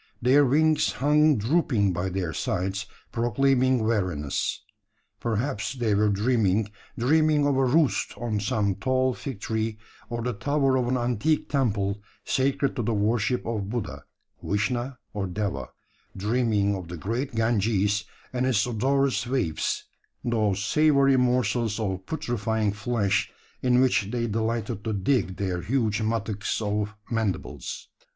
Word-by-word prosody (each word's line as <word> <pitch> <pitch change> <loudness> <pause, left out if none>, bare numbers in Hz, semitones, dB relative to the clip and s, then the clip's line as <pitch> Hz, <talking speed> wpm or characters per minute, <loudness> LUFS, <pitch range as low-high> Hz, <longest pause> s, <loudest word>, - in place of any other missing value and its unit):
Their 135 +4 +5
wings 155 +4 +3
hung 150 +1 +4
drooping 110 - +2
by 90 +2 -2
their 90 -3 -2
sides, 95 +5 -2 0.2
proclaiming 130 +1 +2
weariness. 90 -10 -1 0.6
Perhaps 115 +1 -2
they 115 -4 0
were 105 +1 +3
dreaming 105 -1 +1 0.3
dreaming 150 +3 +3
of 145 -1 +2
a 135 0 +3
roost 145 +3 +2
on 115 -3 -2
some 100 0 0
tall 130 +4 +1
fig 135 -4 -6
tree, 110 0 -2 0.3
or 120 -1 -3
the 125 0 -1
tower 135 +5 +1
of 125 -2 +1
an 130 +1 +1
antique 125 +6 0
temple 105 -7 0 0.2
sacred 135 +1 +1
to - - +1
the 115 0 0
worship 110 +4 +1
of 105 -4 -3
Buddha, 120 -2 -4 0.4
Vishna, 120 +5 -1 0.2
or 100 -2 -2
Deva 100 +2 -3 0.5
dreaming 105 -1 +1
of 90 -3 -6
the 85 0 -6
great 115 - -3
Ganges, 105 -2 +1 0.3
and 125 +1 0
its 110 -5 +2
odorous 125 0 +1
waifs 120 -12 -1 0.4
those 105 -4 +1
savoury 140 +1 +4
morsels 125 -3 +1
of 95 -3 -3
putrefying 110 -7 -1
flesh, 105 -1 0 0.3
in 125 -1 +3
which 115 -6 +3
they 120 0 -1
delighted 110 -1 -2
to 110 - -2
dig 100 -1 +1
their 90 -3 -2
huge 110 +1 0
mattocks 110 -1 -1
of 105 0 -2 0.2
mandibles. 110 -6 -3
115 Hz, 135 wpm, -26 LUFS, 100-130 Hz, 0.6 s, Their